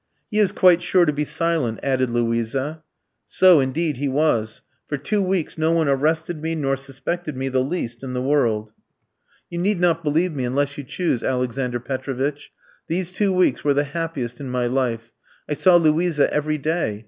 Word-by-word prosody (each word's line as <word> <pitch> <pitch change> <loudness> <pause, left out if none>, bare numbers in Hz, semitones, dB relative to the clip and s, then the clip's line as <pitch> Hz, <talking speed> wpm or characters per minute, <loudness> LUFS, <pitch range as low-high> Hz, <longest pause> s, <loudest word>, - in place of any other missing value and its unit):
"'He 210 - +1
is 200 -3 +4
quite 180 -4 +5
sure 180 0 +3
to 150 - +1
be 150 +1 -1
silent,' 155 -9 -1
added 130 -2 +1
Luisa. 120 +6 -1 0.5
"So, 185 -4 +6
indeed, 145 +2 0
he 140 +2 -1
was. 130 -6 0 0.2
For 145 - -2
two 205 +9 -1
weeks 185 -4 -1
no 160 +1 +2
one 165 -2 +2
arrested 155 +4 0
me 165 +1 -2
nor 135 -3 0
suspected 135 +3 -5
me 135 +1 -2
the 130 -1 +1
least 130 -6 -4
in 130 -1 -5
the 125 - -2
world. 115 -7 +1 0.8
"You 170 - -3
need 195 +1 +1
not 170 -1 +2
believe 160 +4 +1
me 135 -3 -3
unless 140 +3 -1
you 145 - -6
choose, 140 -2 -1
Alexander 125 -1 -1
Petrovitch. 135 +3 -4 0.4
"These 180 +2 -2
two 195 +1 +1
weeks 185 -1 +2
were 145 -1 +2
the 145 - +3
happiest 150 -8 -3
in 135 -2 -6
my 125 -1 -1
life. 120 -3 -2 0.3
I - - -1
saw 180 +4 +4
Luisa 165 -1 +3
every 155 +1 0
day. 150 -8 -1
145 Hz, 185 wpm, -22 LUFS, 130-165 Hz, 0.8 s, So